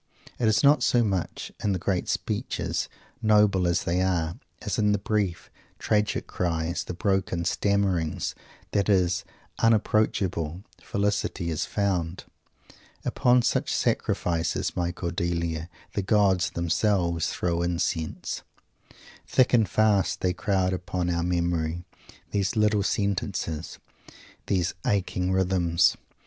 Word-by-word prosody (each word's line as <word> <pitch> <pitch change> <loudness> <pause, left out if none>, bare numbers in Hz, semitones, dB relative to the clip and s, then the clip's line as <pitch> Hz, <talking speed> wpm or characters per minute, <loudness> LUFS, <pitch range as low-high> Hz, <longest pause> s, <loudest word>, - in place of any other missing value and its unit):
It 120 - +2
is 110 +5 +3
not 145 +2 +6
so 120 -1 +3
much 95 -5 -2
in 105 - +2
the - - 0
great 90 0 -1
speeches, - - -2 0.3
noble 105 -4 +4
as 85 - +1
these 90 +2 +1
are, 85 -3 0 0.3
as - - -2
in 105 -1 +3
the - - +2
brief, 100 -4 -2 0.3
tragic 105 -1 0
cries 85 -1 -2
and 90 - -5
broken 95 -4 0
stammerings, 95 -4 0 0.4
that 100 -1 +1
his 90 -3 +2 0.4
unapproachable 100 -6 +1 0.2
felicity 100 -4 -1
is 80 - -2
found. 95 -4 -1 0.8
"Upon 125 0 +3
such - - +1
sacrifices, 85 -1 0
my 90 -1 0
Cordelia, 85 -2 -2 0.2
the - - 0
gods 95 -4 +3
themselves 85 0 +1
throw 85 -1 -1
incense." 85 -2 -2 0.9
Thick 130 -1 +3
and 110 -6 +4
fast 105 -1 +2
they 90 -1 +1
crowd 95 -1 0
upon 90 -1 -2
our 85 0 0
memory, 85 -1 -1 0.5
these 100 +4 0
little 105 -1 +3
sentences, 95 -5 -2 0.7
these 90 -3 +1
aching 95 -2 0
rhythms! 90 -3 +3
95 Hz, 120 wpm, -26 LUFS, 85-100 Hz, 0.9 s, not